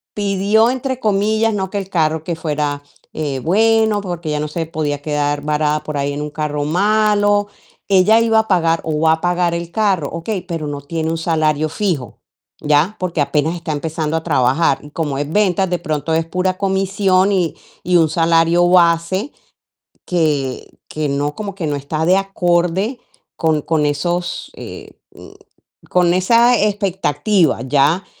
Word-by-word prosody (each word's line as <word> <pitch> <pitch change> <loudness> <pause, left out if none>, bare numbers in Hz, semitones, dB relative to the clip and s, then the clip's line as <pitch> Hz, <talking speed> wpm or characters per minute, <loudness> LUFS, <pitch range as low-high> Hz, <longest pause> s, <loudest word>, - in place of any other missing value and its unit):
"pidió" 205 +3 +2
entre 260 0 -3
comillas, 215 +1 +1
¿no?, 190 -2 -2
que 205 - -4
el 195 -1 -5
carro 160 -3 0
que 170 0 -3
fuera, 150 -2 -2 0.3
eh, 145 -4 -3
bueno, 220 +3 +2
porque 175 -4 -5
ella 150 0 -1
no 150 - -2
se 165 +2 -3
podía 150 -3 -3
quedar 145 -1 -1
varada 150 0 0
por 150 0 -5
ahí 140 0 -1
en 145 - -4
un 150 - -6
carro 150 -1 -3
malo. 205 +3 +2 0.4
Ella 200 +3 +5
iba 225 -1 +3
a 220 - -1
pagar 165 -4 +2
o 155 -1 -2
va 160 0 +4
a 160 - -3
pagar 175 -1 +1
el 170 0 -4
carro, 195 -9 0
okey, 180 +5 -4
pero 165 -4 -4
no 145 -1 -5
tiene 160 +2 -3
un 165 - -2
salario 155 -2 0
fijo, 160 - -3 0.4
¿ya? 150 +7 +2
Porque 175 -4 -1
apenas 150 +3 0
está 165 -2 -4
empezando 160 +1 -2
a 160 - -4
trabajar, 135 -1 +2
y 150 - -11
como 145 -4 -3
es 145 +1 -3
ventas, 190 -1 +1
de 180 - 0
pronto 155 +1 -2
es 165 0 0
pura 185 +2 -1
comisión 195 0 +1
y 180 -5 0 0.3
y 180 0 +3
un 160 -2 +3
salario 165 +2 +3
base 175 - +2 0.7
que 150 -7 -1 0.2
que 155 -1 -3
no, 145 +1 -2
como 205 -2 -5
que 175 -5 -3
no 145 - -1
está 150 +3 -3
de 185 +2 +5
acorde 190 +3 0 0.4
con 160 -2 +1
con 155 0 0
esos, 175 +5 -2
eh, - - -9 0.2
mm, - - -13 0.6
con 175 -1 +3
esa 235 +6 +4
expectativa, 195 -5 +1
¿ya?, 145 +7 +2
170 Hz, 170 wpm, -18 LUFS, 150-195 Hz, 0.7 s, Ella